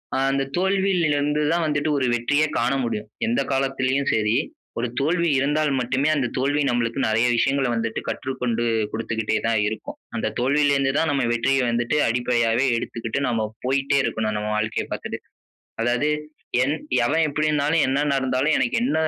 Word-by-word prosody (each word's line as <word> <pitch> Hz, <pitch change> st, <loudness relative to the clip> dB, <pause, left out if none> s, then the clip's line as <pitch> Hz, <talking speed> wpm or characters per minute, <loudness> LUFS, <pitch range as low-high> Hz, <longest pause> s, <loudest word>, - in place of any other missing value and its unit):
ஆ -, -, +1 dB
அந்த 135 Hz, 0 st, +1 dB
தோல்வியில 190 Hz, -2 st, +2 dB
இருந்து 145 Hz, +1 st, 0 dB
தான் 170 Hz, -, +1 dB
வந்துட்டு 150 Hz, 0 st, 0 dB
ஒரு 135 Hz, -, +1 dB
வெற்றியே 145 Hz, +6 st, +2 dB
காண 120 Hz, +4 st, +1 dB
முடியும். 110 Hz, -2 st, -3 dB, 0.2 s
எந்த 120 Hz, +4 st, +1 dB
காலத்திலேயும் 135 Hz, 0 st, 0 dB
சரி, 110 Hz, +1 st, +1 dB, 0.4 s
ஒரு 120 Hz, +1 st, 0 dB
தோல்வி 170 Hz, +4 st, +1 dB
இருந்தால் 150 Hz, +1 st, +1 dB
மட்டுமே 130 Hz, +4 st, 0 dB
அந்த 135 Hz, -4 st, 0 dB
தோல்வி 140 Hz, +3 st, +1 dB
நமக்கு 120 Hz, +1 st, -1 dB
நெறைய 115 Hz, +2 st, +2 dB
விஷயங்கள 135 Hz, +2 st, +1 dB
வந்துட்டு 115 Hz, -1 st, -2 dB
கற்றுக்கொண்டு 125 Hz, -3 st, -2 dB, 0.3 s
குடுத்துக்கிட்டே 110 Hz, -1 st, -1 dB
தான் 115 Hz, -1 st, +2 dB
இருக்கும். 110 Hz, +1 st, -6 dB, 0.2 s
அந்த -, -, -1 dB
தோல்வியில 140 Hz, +3 st, +3 dB
இருந்து 135 Hz, -1 st, +1 dB
தான் 160 Hz, -, +1 dB
நம்ம 140 Hz, -2 st, +1 dB
வெற்றிய 135 Hz, +3 st, +1 dB
வந்துட்டு 120 Hz, +5 st, 0 dB
அடிப்படையாவே 120 Hz, 0 st, +1 dB
எடுத்துக்கிட்டு 115 Hz, +2 st, -3 dB
நம்ம 115 Hz, -3 st, 0 dB, 0.2 s
போயிட்டே 135 Hz, +2 st, +1 dB
இருக்கணும். 110 Hz, -3 st, -1 dB
நம்ம 105 Hz, 0 st, -3 dB
வாழ்க்கைய 110 Hz, +1 st, -1 dB
பார்த்துட்டு. -, -, -4 dB, 0.6 s
அதாவது 120 Hz, +5 st, +1 dB, 0.5 s
என் 145 Hz, +3 st, 0 dB, 0.3 s
எவன் 160 Hz, +5 st, +2 dB
எப்பிடினாலும், 150 Hz, +1 st, +1 dB
"என்ன 135 Hz, +1 st, +1 dB
நடந்தாலும் 135 Hz, +2 st, +1 dB
எனக்கு 240 Hz, -, 0 dB
என்ன 255 Hz, -, 0 dB
135 Hz, 155 wpm, -23 LUFS, 115-145 Hz, 0.6 s, தோல்வியில